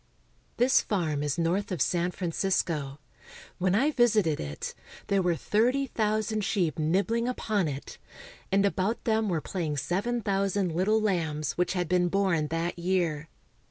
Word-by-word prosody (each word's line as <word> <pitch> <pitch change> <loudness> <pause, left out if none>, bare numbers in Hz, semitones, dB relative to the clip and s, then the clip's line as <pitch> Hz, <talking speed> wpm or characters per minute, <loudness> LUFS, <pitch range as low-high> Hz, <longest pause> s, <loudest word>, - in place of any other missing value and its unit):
This 245 +2 +4
farm 160 -8 -1
is 145 +1 -1
north 175 +5 0
of 180 - -2
San 175 0 +1
Francisco. 165 -5 -1 0.6
When 185 +1 +2
I 275 +8 +3
visited 215 - +3
it, 75 0 -5 0.4
there 195 -1 +3
were 175 -2 +1
thirty 245 - +1
thousand 215 -2 -1
sheep 185 -7 0
nibbling 200 +9 +1
upon 215 -7 0
it, 140 -1 -6 0.5
and 195 +1 +3
about 200 +3 0
them 220 -2 +1
were 165 -4 0
playing 160 -5 -3
seven 210 - -1
thousand 195 -2 0
little 190 +7 +2
lambs 160 -8 -1
which 180 +1 -1
had 180 -2 -1
been 180 0 +2
born 185 -5 +1
that 165 +2 -2
year. 170 -4 0
185 Hz, 150 wpm, -28 LUFS, 165-210 Hz, 0.6 s, This